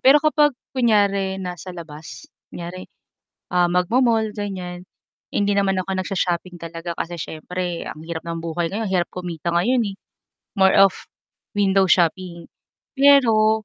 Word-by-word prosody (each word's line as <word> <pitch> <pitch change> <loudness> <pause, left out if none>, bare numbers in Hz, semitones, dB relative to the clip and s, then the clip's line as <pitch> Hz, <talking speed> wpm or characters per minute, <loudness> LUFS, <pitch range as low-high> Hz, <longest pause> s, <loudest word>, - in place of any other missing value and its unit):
Pero 270 +3 +7
kapag 295 -3 +3 0.2
kunyari 200 -6 +2
nasa 180 -1 -6
labas, 165 - -9 0.2
kunyari, 175 +2 -8 0.6
ah, 180 -1 +3
mag-mo-mall 220 +6 +2
ganiyan, 180 -3 -5 0.5
hindi 205 0 +1
naman 195 -1 +2
ako 195 - -9
nag-sho-shopping 180 -2 -2
talaga 165 +1 -6
kasi 170 +1 -5
siyempre 175 +2 -5
ang 155 +1 -9
hirap 165 -1 -5
ng 170 0 -5
buhay 165 +1 -2
ngayon 220 +4 -3
ang 190 - -3
hirap 175 -2 +1
kumita 175 -2 -5
ngayon, 215 +9 +2
eh. - - -14 0.6
More 190 0 +5
of 195 -1 +7 0.6
window 195 -2 +3
shopping 175 -1 +1 0.4
pero 225 -6 +4
185 Hz, 135 wpm, -22 LUFS, 170-205 Hz, 0.6 s, Pero